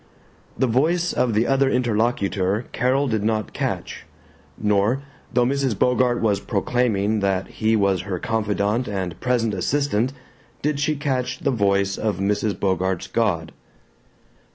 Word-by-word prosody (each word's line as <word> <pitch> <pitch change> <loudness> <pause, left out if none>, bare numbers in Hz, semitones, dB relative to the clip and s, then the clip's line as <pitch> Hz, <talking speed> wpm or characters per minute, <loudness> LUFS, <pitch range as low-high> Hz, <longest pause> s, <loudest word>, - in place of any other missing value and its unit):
The - - +2
voice 160 +9 +1
of 120 -4 +1
the 110 +2 +3
other 135 +1 +3
interlocutor 110 -4 0
Carol 130 +4 +1
did 110 -4 -1
not 110 -1 -1
catch, - - -4 0.5
nor, 105 +6 +1 0.3
though 120 0 +3
Mrs. 135 -4 0
Bogart 125 0 +2
was 105 -3 +2
proclaiming 110 0 0
that 95 -1 0
he 110 0 +1
was 100 -4 +2
her 95 -1 -4
confidant 105 +3 0
and 95 -4 -4
present 120 -3 0
assistant, 130 +3 0 0.5
did 150 -1 0
she 150 +1 +1
catch 130 -3 -1
the 140 - +1
voice 100 -3 +1
of 105 -4 -1
Mrs. 100 0 0
Bogart's 95 -1 0
God. 85 -9 0
110 Hz, 135 wpm, -22 LUFS, 100-125 Hz, 0.5 s, the